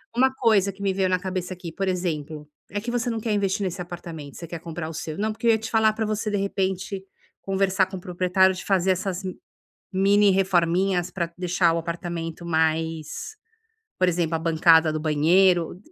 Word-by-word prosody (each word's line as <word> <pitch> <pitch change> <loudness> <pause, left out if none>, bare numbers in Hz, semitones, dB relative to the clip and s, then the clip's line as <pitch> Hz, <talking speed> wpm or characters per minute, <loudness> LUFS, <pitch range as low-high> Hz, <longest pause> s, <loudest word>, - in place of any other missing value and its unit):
Uma 260 +2 +3
coisa 215 -6 +3
que 195 +1 -15
me 195 -1 +1
veio 190 -1 +1
na 185 0 +2
cabeça 185 0 -4
aqui, 175 -2 -8
por 195 +3 -3
exemplo 160 -5 -3 0.2
é 205 +1 -3
que 240 +3 -4
você 245 0 -1
não 225 -1 -2
quer 220 - -2
investir 200 0 0
nesse 185 -1 -3
apartamento, 165 -5 -8
você 170 - -7
quer 170 0 -7
comprar 165 -1 -6
o - - -7
seu 155 0 -5
não, 215 +2 0
porque 225 +2 -3
eu - - +7
ia 220 - +4
te 225 +1 -7
falar 220 -1 +4
pra 220 0 -2
você, 215 0 -2
de 205 - -1
repente, 190 -1 -2 0.4
conversar 195 0 +1
com 190 +1 -9
o - - -5
proprietário 185 +1 +2
de 185 - -8
fazer 190 -1 +2
essas 185 0 -2
m 185 -1 -4 0.6
mini 200 +1 +4
reforminhas 185 -1 +1
pra 170 -3 -3
deixar 180 -1 +2
o - - 0
apartamento 170 0 -4
mais 160 - -1 0.6
por 185 - +4
exemplo, 170 -2 0
a 165 - +1
bancada 160 -1 +4
do 155 - -2
banheiro. 170 +3 +3
185 Hz, 205 wpm, -24 LUFS, 170-195 Hz, 0.6 s, eu